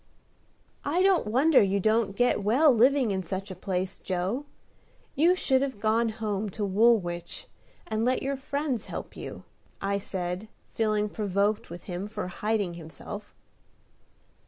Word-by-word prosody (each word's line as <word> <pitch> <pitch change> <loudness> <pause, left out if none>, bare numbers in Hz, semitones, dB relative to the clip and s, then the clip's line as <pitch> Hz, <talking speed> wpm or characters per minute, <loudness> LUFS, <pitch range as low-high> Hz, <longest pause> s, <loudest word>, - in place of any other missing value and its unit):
"I 340 +6 +1
don't 380 - +3
wonder 265 +7 +5
you 200 0 +2
don't 215 0 +2
get 245 -2 +2
well 260 +8 +5
living 250 0 +4
in 190 -1 -1
such 190 +3 -5
a - - -6
place, 185 +1 -3
Joe. 190 +10 -2 0.7
You 340 +5 +4
should 265 -7 +2
have 265 -6 -2
gone 225 +2 +2
home 215 -2 -2
to 210 - 0
Woolwich, 195 -4 +1 0.4
and 220 0 -1
let 255 +2 +1
your 275 +1 -1
friends 275 -2 -2
help - - -7
you," - - -8 0.4
I 200 0 0
said, 185 +1 -4 0.3
feeling 215 -1 +1
provoked 205 0 0
with 170 +1 -8
him 185 +2 -5
for 210 -3 -5
hiding 205 -1 -1
himself. 170 +5 -9
215 Hz, 145 wpm, -28 LUFS, 195-245 Hz, 0.7 s, wonder